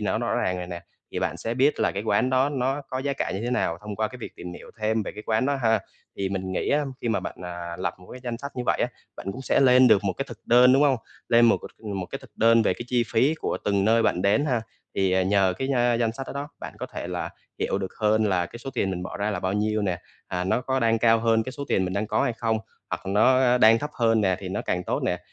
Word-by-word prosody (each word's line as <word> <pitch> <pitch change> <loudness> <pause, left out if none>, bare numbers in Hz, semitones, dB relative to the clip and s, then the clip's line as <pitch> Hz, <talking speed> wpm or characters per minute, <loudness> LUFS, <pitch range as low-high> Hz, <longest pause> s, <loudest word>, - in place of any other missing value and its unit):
nó - - 0
rõ - - -1
ràng 90 - 0
rồi 90 - -5
nè, 85 -1 -6 0.3
thì - - -2
bạn - - -1
sẽ 115 +1 -3
biết 135 +4 +2
là - - +3
cái 100 - -3
quán 110 +4 +1
đó 130 +2 +3
nó 135 +1 -1
có 130 - -3
giá 140 +1 -1
cả - - -2
như 95 - -3
thế 120 - -1
nào 85 -9 0
thông 105 -1 -7
qua 110 +1 0
cái 125 - -11
việc - - -8
tìm 90 0 -7
hiểu - - -11
thêm 110 +1 +1
về - - -6
cái 105 - -8
quán 110 +3 +1
đó 140 0 +1
ha. 110 -2 +3 0.4
Thì 95 - -1
mình 95 -1 -3
nghĩ - - -1
á, 145 +1 +2 0.2
khi 120 - -2
mà 110 -3 +1
bạn, - - -6
à, 85 -1 -6
lập 95 - -2
một 90 - -16
cái 125 - -9
danh 120 -1 -3
sách 140 +2 -6
như 125 - -1
vậy - - +1
á, - - +3 0.3
bạn - - -9
cũng 130 - -8
sẽ - - +2
lên 130 -1 +6
được 105 -2 +4
một 95 - +1
cái 135 - -4
thực 120 - -9
đơn, 125 +2 +6
đúng 135 +2 +5
hông? 140 -3 +4 0.3
Lên 120 0 +6
một 115 - +5 0.4
một 95 -2 -3
cái - - -6
thực - - -15
đơn 115 +1 +5
về 95 - +2
cái - - -6
chi 120 -1 +2
phí 135 +7 +3
của 160 - -2
từng 100 -1 +2
nơi 115 +2 +4
bạn 90 -5 +1
đến 105 +9 +3
ha, 125 -6 0 0.3
thì, 95 -1 +1
ờ, 95 - +3
nhờ 95 0 +3
cái, 135 - -2
a, 120 -1 +3
danh 115 -1 +1
sách 135 +3 -7
đó - - -6
đó, 140 +1 -4
bạn - - -6
có - - -4
thể - - -6
là - - -4 0.3
hiểu - - 0
được 95 -1 -4
hơn 110 0 +3
là 90 -4 +1
cái 115 - -11
số 135 +3 -6
tiền 100 -5 0
mình 90 -1 -3
bỏ 90 - -6
ra 105 +1 -1
là - - -3
bao 95 - -1
nhiêu 105 +1 0
nè, 90 -3 -1 0.3
à, 90 -1 -2
nó 95 +6 +1
có 130 +1 -1
đang 115 -1 +3
cao 115 0 +4
hơn 115 0 +2
cái 130 - -6
số 140 +1 -6
tiền 95 - +2
mình 90 - -3
đang 105 +2 -1
có - - +1
hay - - +1
không, 115 -1 -1 0.3
hoặc - - -4
nó 125 +5 +4
đang 110 0 +7
thấp 150 +5 -4
hơn 115 -2 +2
nè 95 -3 +2
thì 95 - -6
nó 95 - -3
càng 90 0 -2
tốt - - -1
nè. - - 0
110 Hz, 300 wpm, -25 LUFS, 95-125 Hz, 0.4 s, đang